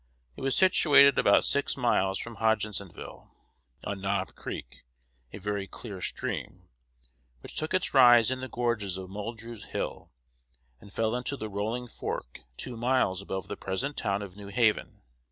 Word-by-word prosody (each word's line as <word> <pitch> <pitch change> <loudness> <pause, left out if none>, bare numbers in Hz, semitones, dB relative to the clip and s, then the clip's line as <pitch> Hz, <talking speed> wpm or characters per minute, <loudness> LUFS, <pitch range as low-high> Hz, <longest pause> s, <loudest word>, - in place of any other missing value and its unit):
It - - -10
was 135 0 0
situated 145 -7 +6
about 100 - +5
six 140 0 +1
miles 95 -6 +2
from 115 -2 -7
Hodgensville, 105 -4 -2 0.6
on 100 -1 -4
Knob 100 -1 -1
Creek, - - -8 0.5
a - - -7
very 100 0 -3
clear 100 -2 -8
stream, - - -4 0.7
which - - -10
took 155 - -2
its 185 - +1
rise 120 -3 +7
in 130 0 -2
the 130 - -4
gorges 115 -6 -1
of 95 0 -8
Muldrews 110 +2 -6
Hill, - - -4 0.7
and 100 - -15
fell 110 +3 0
into 125 +3 -2
the 110 -3 -5
Rolling 110 +5 -2
Fork - - -5 0.2
two 125 - -5
miles 115 -6 +1
above 95 -1 -5
the 100 - -4
present 125 +12 -3
town 100 +1 -1
of 95 -2 -9
New 100 -1 -10
Haven. 110 +1 +1
110 Hz, 155 wpm, -29 LUFS, 100-125 Hz, 0.7 s, rise